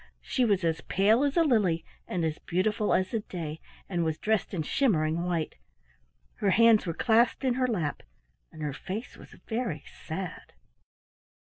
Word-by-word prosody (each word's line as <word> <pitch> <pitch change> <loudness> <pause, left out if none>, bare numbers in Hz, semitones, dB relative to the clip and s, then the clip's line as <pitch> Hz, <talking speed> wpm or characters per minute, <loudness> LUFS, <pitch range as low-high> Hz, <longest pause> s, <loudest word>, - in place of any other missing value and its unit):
She 255 - +1
was 200 -4 +2
as 160 -1 0
pale 215 +7 +3
as 285 +3 0
a 335 - +6
lily 195 - +2 0.2
and 175 -2 -1
as 155 -1 -2
beautiful 210 +5 0
as 185 0 +2
the 225 - 0
day, 160 -6 -6 0.3
and 175 -3 -1
was 160 -1 -1
dressed 220 -1 0
in 170 -5 -2
shimmering 160 - +1
white. 170 -3 -1 0.8
Her 205 - +1
hands 225 0 +5
were 165 - -1
clasped 235 +3 +3
in 260 -2 +2
her 255 0 +1
lap 175 -11 -2 0.5
and 155 -1 -8
her 145 -2 -2
face 195 - -6
was - - -14
very 220 - -2 0.2
sad. 175 +2 -6
190 Hz, 170 wpm, -28 LUFS, 165-225 Hz, 0.8 s, a